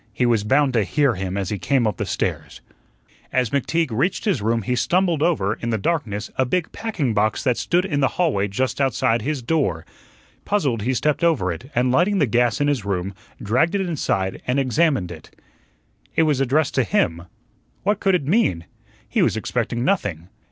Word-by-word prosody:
He 125 - 0
was 115 -4 +2
bound 135 +4 +2
to 115 -3 +3
hear 140 +5 +1
him 95 -1 -4
as 95 -2 -2
he 105 - -2
came 135 0 +1
up 105 -5 -1
the - - -3
stairs. - - -3 0.7
As 125 -4 +1
McTeague 150 +2 0
reached 135 - 0
his 190 - +1
room 115 +1 0
he 125 +5 -1
stumbled 175 +2 +1
over, 150 - +1
in 115 - -5
the 110 - 0
darkness, 105 - -2
a 130 - +3
big 165 +6 -1
packing 170 - -2
box 105 +1 +1
that 125 -3 +2
stood 180 +7 +1
in 150 -7 -1
the 135 - +3
hallway 145 - +1
just 125 +6 -2
outside 130 -3 +1
his 140 +1 -3
door. 130 - 0 0.6
Puzzled, 140 - 0
he 130 +5 0
stepped 150 +5 0
over 145 - +2
it, 85 - -8
and 125 +1 +2
lighting 180 +9 +2
the 155 - +3
gas 120 0 +1
in 145 - +2
his 140 -7 0
room, 95 -1 -2 0.3
dragged 130 - +1
it 200 - +1
inside 135 - -2
and 125 +2 +1
examined 135 - +1
it. 80 -3 -13 0.8
It 165 - +4
was 150 -4 +1
addressed 135 +3 +1
to 130 - +2
him. 85 -4 0 0.6
What 205 +1 +1
could 195 -2 +2
it 145 - -1
mean? 135 - +1 0.4
He - - 0
was - - +2
expecting 120 +1 -2
nothing. 95 - -1
130 Hz, 195 wpm, -22 LUFS, 105-155 Hz, 0.8 s, It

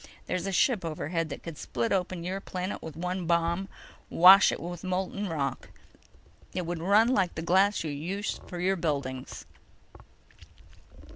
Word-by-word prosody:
There's 180 +1 -2
a - - -1
ship 205 +2 +2
overhead 165 0 -3
that - - -7
could 165 -4 -8
split 120 -2 -2
open 180 -2 -1
your 190 +3 -3
planet 185 +1 -5
with 160 -3 -8
one 180 +1 -3
bomb—wash 175 +2 +4
it - - -4
with 175 0 -7
molten 190 +2 -2
rock. 140 -5 -3 0.9
It'd 175 -2 -3
run 205 +7 +4
like 195 -8 +1
the 160 - -4
glass 190 +3 +3
you 155 - -3
use 180 +9 -4
for 180 - -7
your 190 +2 +1
buildings." 140 -6 -3
175 Hz, 145 wpm, -28 LUFS, 165-190 Hz, 0.9 s, bomb—wash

